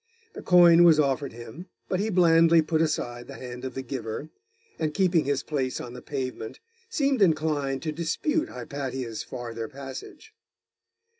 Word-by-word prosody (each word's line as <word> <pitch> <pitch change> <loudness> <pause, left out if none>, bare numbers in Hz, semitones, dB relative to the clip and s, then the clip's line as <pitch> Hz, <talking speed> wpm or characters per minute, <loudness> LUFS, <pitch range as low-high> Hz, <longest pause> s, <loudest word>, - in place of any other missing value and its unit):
The - - -8
coin 175 -1 +7
was 165 -3 +6
offered 140 -1 +1
him, 120 - -10 0.2
but 185 - -1
he 215 +2 0
blandly 165 -3 +5
put 160 +1 0
aside 120 -6 -2
the - - -9
hand 125 0 -8
of 130 -2 -5
the 135 - -4
giver, 130 +2 -5 0.5
and 155 -1 -1
keeping 180 -5 +3
his 140 -1 0
place 135 -4 -2
on 120 - -7
the 125 - -9
pavement, 130 -5 -5 0.3
seemed 275 - +1
inclined 155 -6 +1
to 155 - -2
dispute 300 - -1
Hypatia's 130 -5 -5
farther 115 -2 -6
passage. 135 0 -10
145 Hz, 155 wpm, -26 LUFS, 130-170 Hz, 0.5 s, coin